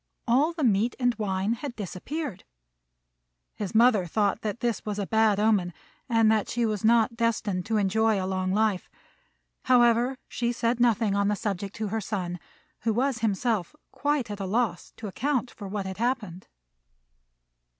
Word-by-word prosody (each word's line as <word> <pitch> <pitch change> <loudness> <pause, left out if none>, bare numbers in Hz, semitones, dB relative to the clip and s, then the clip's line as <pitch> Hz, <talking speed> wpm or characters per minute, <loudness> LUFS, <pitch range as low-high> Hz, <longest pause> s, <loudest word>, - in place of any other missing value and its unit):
all 270 +8 +3
the 330 -3 -4
meat 225 0 +2
and 245 -1 +2
wine 195 +1 0
had 250 +1 -6
disappeared. 230 - -5 1.1
His 205 -1 -5
mother 220 -5 +5
thought 205 +4 0
this 225 +1 -2
was 210 -1 -4
a 200 - -1
bad 220 -1 +3
omen, 205 -5 +2 0.4
and 225 -2 +4
that 215 -2 +1
she 240 0 0
was 215 -3 -2
not 230 +1 +4
destined 220 -5 -1
to 220 -1 +1
enjoy 215 +1 +2
a 185 - -2
long 185 0 -1
life; 210 -2 +1 0.8
however, 245 +1 +4
she 240 0 -1
said 235 0 0
nothing 225 -3 +3
on 200 0 +1
the 210 - +1
subject 200 -2 -4
to 215 -1 -3
her 220 +2 -2
son, 180 -4 -3 0.4
who 225 0 0
was 260 0 +1
himself 220 - -1 0.2
quite 285 -6 -1
at 205 - -6
a 195 - -3
loss 210 -3 -1
to 225 - -8
account 255 +4 -1
for 205 - -9
what 200 0 -3
had 190 0 -5
happened. 220 -7 -2
220 Hz, 165 wpm, -27 LUFS, 200-235 Hz, 1.1 s, mother